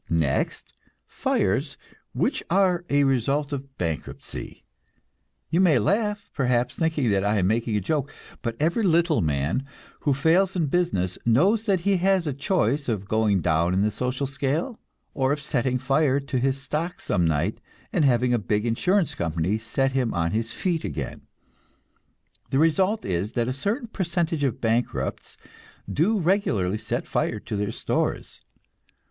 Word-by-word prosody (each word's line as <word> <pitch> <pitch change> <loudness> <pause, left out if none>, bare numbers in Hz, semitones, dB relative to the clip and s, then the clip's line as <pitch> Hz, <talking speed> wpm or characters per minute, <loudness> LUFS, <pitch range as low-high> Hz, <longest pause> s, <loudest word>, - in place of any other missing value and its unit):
Next, 80 -5 -1 0.3
fires - - 0 0.3
which - - 0
are 185 -1 +3
a 145 0 +3
result 140 +3 +1
of 135 -1 -6
bankruptcy. 80 -6 -5 0.9
You 170 +3 +3
may 165 -8 +5
laugh, 205 - 0
perhaps, 125 -2 +1
thinking 155 -8 +1
that 95 -1 +2
I 105 +1 +2
am 95 - +2
making 110 +2 +1
a - - -1
joke; 145 - -1 0.3
but 115 -3 -3
every 170 +9 +1
little 170 - +3
man 75 - 0 0.4
who 145 -3 +1
fails 175 +7 +3
in 170 -3 +1
business 135 - 0
knows 195 - +3
that 190 -4 +2
he 195 +1 +2
has 190 0 +2
a 145 - -1
choice 140 - 0
of 100 -4 -2
going 105 -3 +2
down 85 +2 +2
in 95 - +2
the 105 - +1
social 125 +5 -2
scale, 140 - -2 0.3
or 135 0 +1
of 150 - -3
setting 130 -3 0
fire 135 +1 +2
to 135 -2 -2
his 135 +2 0
stock 160 +5 -3
some 90 -4 +1
night, 80 +6 0 0.3
and 170 - +2
having 125 -2 +3
a 120 - +2
big 105 +2 -1
insurance 180 - +1
company 85 +5 -1
set 135 +4 0
him 130 -5 0
on 85 -1 0
his 115 +2 -1
feet 165 +7 -1
again. 70 -5 -5 1.2
The 135 - 0
result 185 +8 +2
is 95 +3 -2
that 120 -1 0
a 130 - -1
certain 210 - -2
percentage 170 -6 -1
of 135 -5 0
bankrupts 115 +1 -1 0.5
do 195 +10 +2
regularly 125 - +1
set - - -3
fire - - -1
to - - -5
their 105 +1 -1
stores. - - -2
135 Hz, 160 wpm, -25 LUFS, 105-165 Hz, 1.2 s, may